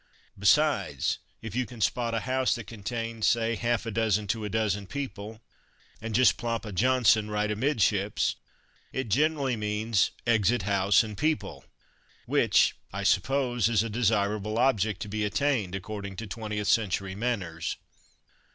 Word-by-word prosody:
Besides, 100 - +2 0.2
if 110 -3 -6
you 125 0 0
can 120 -3 -11
spot 115 +2 0
a 115 - -1
house 130 0 +1
that 120 -3 -7
contains, 115 +1 -3
say, 115 -1 +2
half 120 +2 -1
a 115 - -3
dozen 105 -1 +1
to 110 +1 -1
a 105 - -3
dozen 105 -2 -1
people, 110 -5 -6 0.6
and 110 -1 -4
just 120 -2 +5
plop 115 -1 -3
a 105 - -6
"Johnson" 110 0 +3
right 105 0 0
amidships, 105 -4 +1 0.6
it 130 -3 -3
generally 140 +1 +1
means 105 -1 0 0.2
"exit 115 -1 +2
house 100 +1 +3
and 105 -2 -7
people," 155 +6 -2 0.6
which, - - +3 0.2
I - - -4
suppose, 125 -5 +2
is 110 -2 +2
a 115 - -4
desirable 105 -1 0
object 110 -5 +1
to - - -8
be 105 +1 -2
attained, 105 -4 0
according 100 0 -6
to 110 - -6
twentieth 105 0 -4
century 100 -3 +1
manners. 95 -7 -3
110 Hz, 150 wpm, -28 LUFS, 105-120 Hz, 0.6 s, just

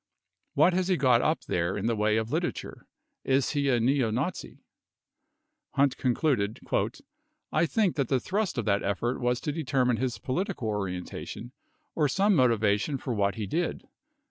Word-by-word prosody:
What 180 - +5
has 185 0 +1
he 185 -2 +2
got 125 -4 +4
up 155 - +1
there 85 +3 -1
in 100 - -3
the 115 0 +1
way 105 0 +2
of 110 0 -2
literature? - - -3 0.4
Is 135 0 +1
he 145 -2 0
a 125 -2 +3
neo 125 0 +2
Nazi? 135 +12 -3
72 - - -28 1.1
Hunt 140 -2 +3
concluded:.. 120 -5 0 0.9
I 170 - +2
think 200 -3 +1
that 140 -4 +1
the 130 0 +2
thrust 195 - -2
of 120 - -1
that 100 -2 +2
effort 100 +6 -1
was 125 0 +1
to 150 - -2
determine 135 -6 +1
his 130 0 -2
political 175 - -2
orientation 100 +4 -5 0.4
or 150 -2 +2
some 195 +9 +2
motivation 115 -1 +2
for 125 -1 -4
what 100 -2 +1
he 110 - -3
did." 165 - -2
125 Hz, 170 wpm, -28 LUFS, 110-150 Hz, 1.1 s, What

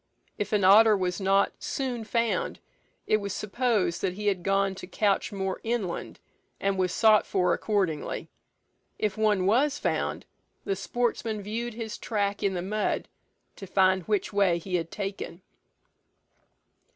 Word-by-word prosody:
If 205 - -2
an 210 -2 +2
otter 210 +3 +7
was 180 -1 -2
not 195 +1 +3
soon 250 -4 -3
found, 230 +1 0 0.5
it 215 - +3
was 200 -2 -4
supposed 210 -5 0
that 185 -2 0
he 210 +1 -6
had 195 -3 +1
gone 195 +1 +1
to - - -8
couch 200 +3 +1
more 190 -2 -3
inland, 225 -6 -3 0.4
and 195 0 0
was 185 -1 +1
sought 215 +1 +5
for 180 -2 +1
accordingly. 190 -8 -1 0.7
If 210 -3 -1
one 210 -4 +2
was 270 +8 +3
found, - - -2 0.4
the 195 - 0
sportsmen 225 0 -2
viewed 230 +3 -4
his 225 -2 -5
track 205 -2 -1
in 195 -2 0
the 175 - -2
mud, 210 +3 -1 0.5
to 195 - -8
find 190 0 +3
which 210 -1 0
way 195 -4 +3
he 180 +2 -7
had 165 -2 0
taken. 195 -3 -5
200 Hz, 150 wpm, -27 LUFS, 190-215 Hz, 0.7 s, otter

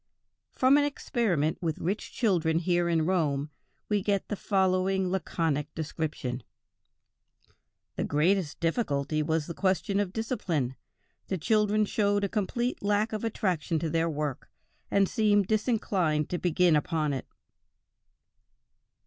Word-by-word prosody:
From 260 +2 +4
an - - +3
experiment 225 - 0
with 160 -3 -1
rich 195 +6 -3
children 170 -8 +1
here 175 0 +1
in 165 -2 +2
Rome, 150 -5 0 0.4
we 210 -1 +1
get 200 0 -1
the 210 - -1
following 190 -1 +1
laconic 160 -5 -1
description: 150 -5 -3 1.6
"The - - 0
greatest 160 +2 +1
difficulty 155 - 0
was 160 0 0
the 170 - -5
question 195 +2 0
of 200 -3 -1
discipline. 180 - -2 0.5
The 190 - -1
children 210 +4 +2
showed 205 -1 +1
a 200 - 0
complete 235 +5 -1
lack 205 +2 +1
of 215 - -3
attraction 185 -7 -1
to 160 0 -2
their 165 0 +1
work, 150 -3 -3 0.4
and 200 -1 +3
seemed 205 -3 +3
disinclined 195 - 0
to 175 - -1
begin 175 -1 +3
upon 150 0 0
it." 135 - -4
180 Hz, 130 wpm, -28 LUFS, 155-205 Hz, 1.6 s, From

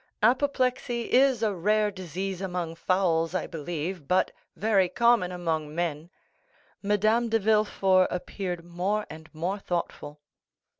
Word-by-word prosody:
Apoplexy 250 -1 +1
is 260 -3 +4
a 215 -2 +2
rare 210 +3 +1
disease 190 0 -5
among 180 -3 -3
fowls, 170 -1 +1
I - - 0
believe, 165 0 -5
but 185 +1 +2 0.2
very 200 -4 +2
common 235 -6 +3
among 160 -4 -3
men." 165 -2 -2 0.7
Madame 215 +3 +2
de 225 - +3
Villefort 200 -3 +3
appeared 180 -1 -4
more 185 +5 -1
and 160 +1 -11
more 175 +6 -3
thoughtful. 170 -5 -4
185 Hz, 120 wpm, -27 LUFS, 170-215 Hz, 0.7 s, is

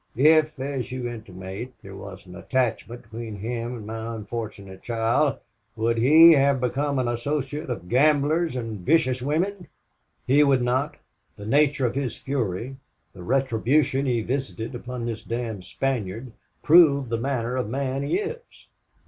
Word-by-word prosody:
If 155 +3 +4
as 135 -2 -3
you 125 -1 -3
intimate 105 +1 -7
there 100 -1 -10
was 100 -1 -10
an 90 0 -12
attachment 120 0 -2
between 115 -1 -7
him 115 +3 -4
and 110 - -9
my 115 +1 -5
unfortunate 105 -3 -7
child, 120 +4 +1 0.4
would 115 +1 0
he 160 +7 +8
have 140 -3 +4
become 140 +3 -1
an 130 -2 0
associate 140 +4 -3
of 115 -8 -5
gamblers 150 - +2
and 115 -4 -4
vicious 130 - +2
women?" 175 +7 -1 0.6
"He 145 +3 +5
would 135 -3 +3
not. 130 +4 0 0.4
The 100 - -10
nature 145 +3 +2
of 120 - 0
his 130 -4 -3
fury, 125 -1 -3 0.4
the 95 - -11
retribution 135 +4 +1
he 120 -3 +1
visited 130 -1 -3
upon 125 0 -6
this 115 -1 -4
damned 115 -5 -4
Spaniard, 120 -3 -3 0.3
prove 145 -6 +6
the 115 0 -1
manner 125 -1 -2
of 125 -5 -2
man 135 +2 -2
he 140 - 0
is." 445 +4 -4
125 Hz, 150 wpm, -25 LUFS, 115-140 Hz, 0.6 s, he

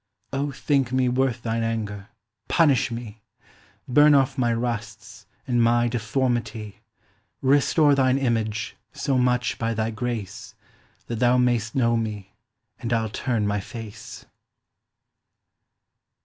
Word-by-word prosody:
O 140 +1 -1
thinke 135 -3 0
mee 130 -1 +2
worth 125 -1 0
thine 115 0 -1
anger, 105 -3 -3 0.4
punish 150 -6 +3
mee. 115 -2 -7 0.7
Burne 145 +3 +6
off 135 -2 +2
my 120 -2 +1
rusts, 115 -2 -4 0.2
and 120 -2 +1
my 120 +1 +3
deformity, 120 -2 -2 0.6
Restore 145 +2 +4
thine 130 -1 +3
Image, 110 -5 -1 0.2
so 140 - -1
much, 125 0 +1
by 115 0 -1
thy 110 +1 -1
grace, 115 -3 -5 0.5
That 115 -2 -4
thou 125 0 +4
may'st 120 -3 +1
know 120 -3 +2
mee, 105 -4 -4 0.5
and 120 -1 -4
I'll 115 -2 +1
turne 115 -1 -1
my 105 0 0
face. 110 +1 -9
120 Hz, 120 wpm, -24 LUFS, 110-130 Hz, 0.7 s, Burne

